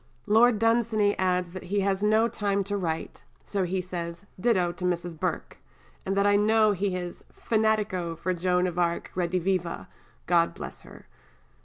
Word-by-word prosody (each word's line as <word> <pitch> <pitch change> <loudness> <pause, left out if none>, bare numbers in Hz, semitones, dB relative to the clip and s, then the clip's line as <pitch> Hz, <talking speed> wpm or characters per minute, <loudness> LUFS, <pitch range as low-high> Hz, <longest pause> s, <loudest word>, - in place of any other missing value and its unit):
Lord 225 +2 +5
Dunsany 225 -2 +2
adds 180 -2 0
that 185 - -7
he 200 +2 0
has 195 0 0
no 215 +2 +3
time 200 -3 -1
to 205 +1 -3
write, 165 -5 -3 0.2
so 195 -2 -1
he 185 +1 -2
says, 170 -1 -6 0.2
"ditto 185 -5 +2
to 175 +1 -9
Mrs. 175 -1 -1
Burke," - - -3 0.5
and 195 +1 0
that 200 - +3
I 205 0 +4
know 215 +1 +4
he 195 -1 -1
is 175 -1 -6
"fanatico 215 -6 0
for 185 +2 -1
Joan 180 +1 +1
of 180 -1 -2
Arc 170 -1 -1
rediviva, 180 0 -1 0.4
God 170 -1 +2
bless - - -8
her." - - -14
185 Hz, 165 wpm, -27 LUFS, 175-210 Hz, 0.5 s, Lord